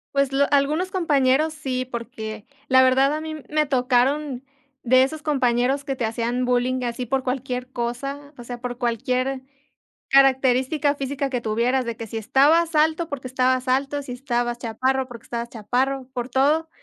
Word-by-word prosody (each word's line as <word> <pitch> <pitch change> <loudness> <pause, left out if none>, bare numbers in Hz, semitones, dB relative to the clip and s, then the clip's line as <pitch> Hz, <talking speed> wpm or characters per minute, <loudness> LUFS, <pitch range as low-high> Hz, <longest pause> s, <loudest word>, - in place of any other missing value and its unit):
Pues, 275 -1 +2
lo 280 +1 +3
algunos 295 +6 +2
compañeros 305 -4 +2
sí, 260 -4 -3
porque, 225 -3 -7 0.2
la 260 -1 +6
verdad 265 +2 +4
a 310 - -4
mí 315 0 -5
me 305 0 +2
tocaron 260 +1 +1 0.4
de 255 +1 +5
esos 300 +3 -3
compañeros 265 -2 +1
que 270 -2 -2
te 245 - -2
hacían 235 +3 -1
bullying 250 +1 0
así 240 +1 -3
por 265 +2 -1
cualquier 255 0 -3
cosa, 275 +4 -4
o 240 - -9
sea, 240 0 -7
por 245 0 -5
cualquier 255 +2 -1 0.7
característica 270 +2 +3
física 275 0 -3
que 255 -2 -2
tuvieras, 235 +4 0
de 235 -1 -4
que 230 - -7
si 225 +1 -5
estabas 310 +9 +3
alto, 315 +2 +2
porque 275 -4 -6
estabas 255 0 +1
alto, 275 +3 0
si 260 -3 -7
estabas 240 -2 -2
chaparro, 260 +3 -1
porque 235 -2 -11
estabas 235 0 -4
chaparro, 255 +4 -1
por 245 -1 -4
todo. 290 +6 +2
260 Hz, 170 wpm, -23 LUFS, 245-280 Hz, 0.7 s, la